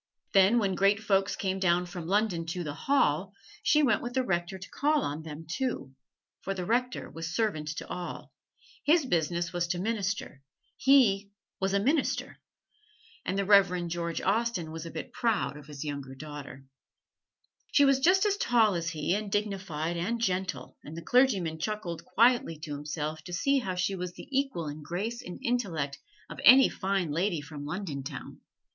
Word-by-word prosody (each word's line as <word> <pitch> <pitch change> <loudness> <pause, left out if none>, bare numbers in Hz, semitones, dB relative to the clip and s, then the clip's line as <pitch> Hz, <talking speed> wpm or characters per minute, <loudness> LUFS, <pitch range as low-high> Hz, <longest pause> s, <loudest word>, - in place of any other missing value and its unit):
Then 195 +3 +6
when 200 -4 +1
Great 195 +2 +3
Folks 200 -2 +1
came 190 -1 -2
down 180 -1 +2
from 175 -2 -7
London 190 -4 +1
to 175 +2 -3
"the 150 -3 -4
Hall," 275 - +1 0.3
she 300 0 +4
went 240 -7 +3
with 240 0 -5
the 260 - +2
Rector 175 -3 -1
to 190 - -10
call 295 +1 +2
on 150 +2 -3
them 160 0 -8
too, 175 - -3 0.5
for 195 - -3
the 180 -2 -3
Rector 250 +4 0
was 165 +1 -5
servant 205 -10 0
to - - -5
all 180 -1 -6 0.5
his 310 0 +4
business 170 -4 0
was 175 0 0
to 175 +1 -1
minister: 200 -8 -2 0.3
he 220 -8 +4 0.3
was 195 0 0
a - - +4
Minister. 280 +8 0 0.9
And 190 - -1
the 200 - +1
Reverend 180 -4 +4
George 170 -1 -2
Austen 220 -8 0
was 165 +1 -6
a - - -6
bit 160 - -7
proud 225 - 0
of 150 -1 -12
his 145 -1 -7
younger 140 -2 -5
daughter. 140 -2 -9 1.1
She 285 - +6
was 275 -1 +4
just 370 +7 +4
as 405 -1 +2
tall 225 - +3
as 170 -1 -1
he, 160 +1 -1
and 205 0 -2
dignified 190 -6 -2
and 225 +8 -1
gentle: 185 - -2
and 155 +3 -9
the 170 - -6
clergyman 195 -10 +2
chuckled 185 -2 -3
quietly 235 -7 +3
to 155 -2 -5
himself 150 +1 -4
to 175 - -7
see 275 +10 +2
how 190 -7 -3
she 180 +2 0
was 180 -2 -4
the - - -11
equal 270 - 0
in 150 +1 -6
grace 205 +10 -3
and 180 - -8
intellect 165 - -1 0.3
of - - -9
any 260 +4 +9
Fine 190 -4 -1
Lady 170 +2 0
from 145 0 -8
London 155 -3 -4
town. 135 - -8
185 Hz, 180 wpm, -29 LUFS, 165-225 Hz, 1.1 s, any